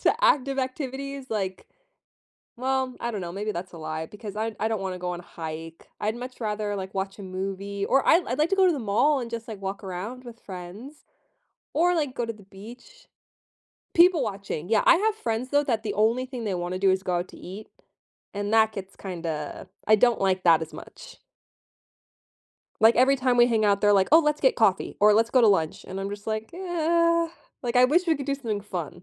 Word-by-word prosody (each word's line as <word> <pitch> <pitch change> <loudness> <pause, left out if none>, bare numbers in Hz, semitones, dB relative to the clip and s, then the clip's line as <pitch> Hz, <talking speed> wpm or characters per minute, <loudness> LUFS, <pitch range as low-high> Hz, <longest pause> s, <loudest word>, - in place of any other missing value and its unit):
to - - +4
active 275 - +3
activities, 270 +1 -4
like 190 -3 -3 0.9
well, 260 0 -1
I 235 - -2
don't 210 - -4
know, 170 -1 -5
maybe 205 +3 -3
that's 180 0 -6
a 165 - -10
lie, 155 0 -4
because 210 +1 -9
I 220 0 -2
I 220 - +1
don't 220 -3 -2
wanna 185 -1 -4
go 180 0 -3
on 175 - -5
a - - -13
hike. 165 0 -8
I'd 215 +1 -1
much 250 +1 -8
rather, 210 -2 -2
like, 190 0 -6
watch 195 +1 -3
a - - -8
movie, 195 +1 -4
or 270 - +2
I'd 345 +1 +5
I'd 250 - -3
like 305 +2 +2
to 390 - +2
go 380 -1 +5
to 355 - +4
the 290 - -3
mall 245 +7 +2
and 235 -2 -6
just, 230 0 -6
like, 210 -3 -7
walk 195 0 -5
around 205 +8 -6
with 235 -1 -11
friends 200 +10 -10 0.7
or, 350 +3 +3
like, 295 -6 -1
go 240 - -2
to 230 - -3
the 210 -2 -16
beach. 235 - -14 0.9
People 345 -1 +6
watching, 195 -5 -5
yeah. 220 -2 +3
I - - +8
have 430 +4 +1
friends, 235 - -3
though, 290 0 +3
that 230 -5 0
the 210 - -2
only 230 +5 +2
thing 250 -3 -6
they 200 -3 -1
wanna 175 +1 -3
do 195 0 +3
is 190 0 +1
go 180 -2 -1
out 175 - -4
to - - -14
eat, 200 +4 -9 0.7
and 205 +1 -3
that 220 -1 +5
gets 195 -1 -8
kinda 165 -5 -5 0.2
I 215 - +7
don't 235 +1 +3
like 190 -1 +1
that 165 -2 +5
as 160 - -6
much. - - -12 1.6
Like, 225 +1 +6
every 265 +2 +5
time 255 -1 +1
we 240 - +6
hang 225 -3 +1
out, 200 -1 +3
they're 205 0 +4
like, 195 -1 +3
"Oh, 320 - +8
let's 300 -1 +1
get 265 - +3
coffee," 195 -4 +1
or, 210 +1 +7
"Let's 225 +2 +3
go 255 - +4
to - - +7
lunch." 165 -6 +1
And 190 +1 -6
I'm 195 - -3
just 205 0 -8
like, 220 0 -3
"Yeah." 335 -1 +1 0.3
Like, 240 0 -1
I 250 - +7
wish 340 +8 +3
we 325 -2 +3
could 275 - -6
do 280 - +1
something 225 -7 -3
fun. 180 -6 -6
220 Hz, 225 wpm, -26 LUFS, 195-260 Hz, 1.6 s, I